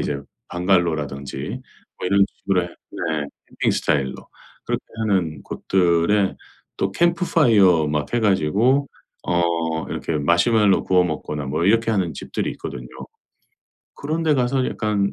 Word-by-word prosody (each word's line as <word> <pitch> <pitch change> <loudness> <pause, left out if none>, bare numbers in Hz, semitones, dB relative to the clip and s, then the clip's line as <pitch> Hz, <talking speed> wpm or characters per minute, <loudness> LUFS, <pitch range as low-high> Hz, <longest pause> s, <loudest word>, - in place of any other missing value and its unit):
이제 70 -1 -2 0.3
방갈로라든지 85 -6 0 0.6
뭐 - - -3
이런 100 +1 +4
식으로 95 -3 0
해 - - -4 0.3
네 80 -3 -2 0.4
캠핑 - - +3
스타일로. 65 -3 0 0.5
그렇게 - - -2 0.2
하는 85 -8 0
곳들에 95 +2 +1 0.4
또 95 0 0
캠프파이어 120 - +3
막 75 +5 -2
해 120 - +2
가지고 110 - +2 0.4
어 85 -2 0
이렇게 80 - -2
마시멜로 100 +7 +3
구워 90 -1 +3
먹거나 75 -3 -4
뭐 75 +5 -1
이렇게 115 +2 +3
하는 90 -7 0
집들이 - - -3
있거든요. - - -7 1.1
그런데 155 +1 0
가서 130 0 +1
약간 105 -2 -1
90 Hz, 295 characters per minute, -22 LUFS, 80-110 Hz, 1.1 s, 이런